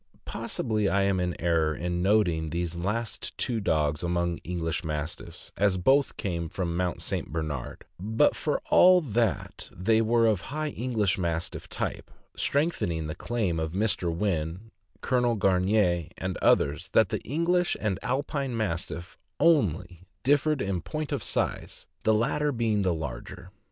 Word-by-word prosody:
Possibly 105 -3 -1
I 100 0 +2
am 100 -1 +2
in 90 -1 -2
error 80 -2 +2
in 90 +2 -2
noting 90 -5 +2
these 85 +1 -2
last 105 +6 -3
two 120 -3 -1
dogs 75 -6 +1
among 85 0 -1
English 85 -2 -3
Mastiffs, 75 0 -5
as 100 -2 +2
both 135 +10 +3
came 85 -4 -3
from 85 -2 -3
Mount 90 -1 -1
St. - - -3
Bernard; 75 -5 -4
but, 110 +9 +2
for 150 - -1
all 180 0 +8
that, 115 - -1
they 110 +5 +2
were 115 +1 +3
of 105 -4 +2
high 155 +2 -3
English 115 -8 0
Mastiff 85 0 -3
type, - - -4 0.3
strengthening 140 - 0
the 75 - -3
claim 100 -4 -1
of 80 0 -3
Mr. 95 -3 +1
Wynn, 85 +3 -2 0.3
Colonel 125 -2 +2
Gamier, 95 -3 +2
and 95 -1 -3
others, 70 +1 +2
that - - +5
the - - -2
English 175 - +1
and 105 -4 -1
Alpine 135 -1 -2
Mastiff 90 -3 -4 0.2
only 95 - +2 0.2
differed 145 +1 +2
in 95 -3 -1
point 155 - -4
of - - -1
size, - - -3 0.2
the 110 - +3
latter 145 +6 +1
being 115 -4 +1
the 95 -2 +2
larger. 80 +4 -7
95 Hz, 150 wpm, -27 LUFS, 85-115 Hz, 0.3 s, all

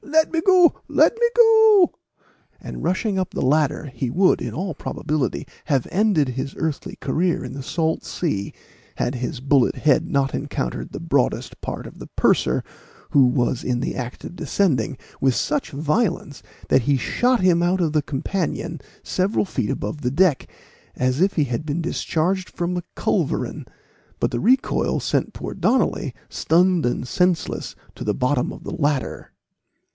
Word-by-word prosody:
Let 315 +3 +2
me 325 - +1
go 365 -2 +5
let - - +4
me 475 0 +4
go!" 445 -5 +6 0.7
and, - - -8
rushing 190 +3 0
up 185 - -1
the - - -4
ladder, 150 0 +1
he 125 +1 -2
would, 185 +8 +3
in - - -3
all 185 +1 -3
probability, 150 -2 -3 0.2
have 140 -5 0
ended 190 -9 +2
his 130 +2 -4
earthly 160 -3 -3
career 175 +1 -1
in - - -7
the 140 - -6
salt 160 +4 -1
sea, 100 - -2 0.4
had 125 - -1
his 125 +2 -4
bullet 135 -1 +2
head 155 +3 +2
not 135 -2 +1
encountered 60 - -3
the - - -6
broadest - - -1
part - - -5
of - - -11
the - - -9
purser, - - +2 0.5
who 135 -3 +6
was 125 0 0
in 125 -1 -1
the 130 - -3
act 125 -1 -6
of - - -8
descending, 150 - 0 0.2
with 130 -2 +3
such 295 -2 -1
violence, 155 - -1 0.3
that 130 - +4
he 140 +2 +2
shot 245 - +1
him 175 -2 +4
out 180 +2 +2
of 160 -4 0
the 155 - +3
companion 165 +3 -3 0.2
several 195 +3 0
feet 125 - -2
above 105 +9 -3
the 125 -2 -1
deck, 165 -1 +2 0.4
as 130 +4 0
if 195 +1 +3
he 155 - +2
had 125 +2 -3
been 155 +1 -2
discharged 180 +2 -1
from 175 +1 -3
a 175 - -3
culverin; - - -1 0.5
but - - 0
the - - -1
recoil 255 +3 +2
sent - - -1
poor - - -6
Donnally, - - +1
stunned 175 -2 +2
and 120 +1 -2
senseless, 180 +3 0 0.2
to - - -8
the 105 -1 0
bottom 125 0 0
of - - -10
the - - -6
ladder. 145 -3 -1
155 Hz, 170 wpm, -22 LUFS, 135-185 Hz, 0.7 s, go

